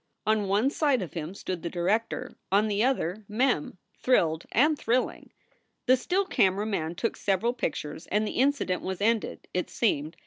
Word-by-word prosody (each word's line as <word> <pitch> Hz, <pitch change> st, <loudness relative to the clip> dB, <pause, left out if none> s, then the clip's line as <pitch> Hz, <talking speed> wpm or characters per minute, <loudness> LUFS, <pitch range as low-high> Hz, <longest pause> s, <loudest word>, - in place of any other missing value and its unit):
On 215 Hz, -2 st, +2 dB
one 210 Hz, +8 st, +2 dB
side 285 Hz, -, +2 dB
of 175 Hz, -, -8 dB
him 165 Hz, +2 st, -5 dB
stood 185 Hz, -3 st, -4 dB
the 170 Hz, -, -3 dB
director, 215 Hz, +8 st, -1 dB, 0.2 s
on 205 Hz, +3 st, +4 dB
the 210 Hz, +1 st, +1 dB
other 220 Hz, -6 st, 0 dB
Mem, 220 Hz, -, 0 dB, 0.2 s
thrilled 165 Hz, -10 st, +2 dB
and 300 Hz, +6 st, +4 dB
thrilling. 250 Hz, -2 st, -1 dB, 0.5 s
The 255 Hz, -, +6 dB
still 360 Hz, +10 st, 0 dB
camera 195 Hz, -, +2 dB
man 175 Hz, -6 st, -2 dB
took 230 Hz, +6 st, -1 dB
several 205 Hz, +5 st, 0 dB
pictures 160 Hz, -8 st, -4 dB
and 210 Hz, +2 st, +1 dB
the 215 Hz, -, -3 dB
in 275 Hz, +2 st, +5 dB
cident 185 Hz, -10 st, -3 dB
was 190 Hz, -1 st, -4 dB
ended, 225 Hz, +2 st, 0 dB
it 180 Hz, -, -1 dB
seemed. 160 Hz, -7 st, 0 dB
210 Hz, 175 wpm, -27 LUFS, 180-250 Hz, 0.5 s, The